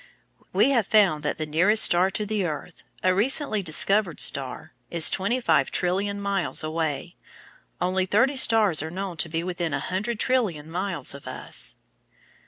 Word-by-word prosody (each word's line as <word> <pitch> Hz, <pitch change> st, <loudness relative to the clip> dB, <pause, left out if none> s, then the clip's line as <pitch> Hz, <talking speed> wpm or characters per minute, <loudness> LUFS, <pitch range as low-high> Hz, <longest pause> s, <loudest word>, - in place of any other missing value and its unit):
We 275 Hz, -, +2 dB
have 230 Hz, -7 st, +1 dB
found 195 Hz, -9 st, +3 dB
that 150 Hz, -, -3 dB
the 155 Hz, -, -3 dB
nearest 180 Hz, +8 st, +4 dB
star 180 Hz, +2 st, +3 dB
to 210 Hz, +2 st, -3 dB
the 210 Hz, -1 st, -2 dB
earth, 165 Hz, +1 st, -6 dB, 0.2 s
a 185 Hz, -, +3 dB
recently 220 Hz, +2 st, +1 dB
discovered 185 Hz, +1 st, +1 dB
star, 135 Hz, -2 st, +1 dB, 0.2 s
is 170 Hz, -2 st, +6 dB
twenty 205 Hz, +7 st, -1 dB
five 145 Hz, -, +1 dB
trillion 195 Hz, +3 st, -1 dB
miles 200 Hz, -5 st, -2 dB
away. 160 Hz, +1 st, -4 dB, 0.6 s
Only 185 Hz, +1 st, -1 dB
thirty 260 Hz, +9 st, +2 dB
stars 220 Hz, -, +2 dB
are 160 Hz, -, -5 dB
known 185 Hz, 0 st, -6 dB
to 170 Hz, -2 st, 0 dB
be 165 Hz, +1 st, -3 dB
within 175 Hz, -4 st, -3 dB
a -, -, -2 dB
hundred 210 Hz, +5 st, -3 dB
trillion 185 Hz, -, -1 dB
miles 175 Hz, -6 st, -3 dB
of 140 Hz, -2 st, -12 dB
us. 130 Hz, -, -3 dB
185 Hz, 165 wpm, -24 LUFS, 160-210 Hz, 0.6 s, is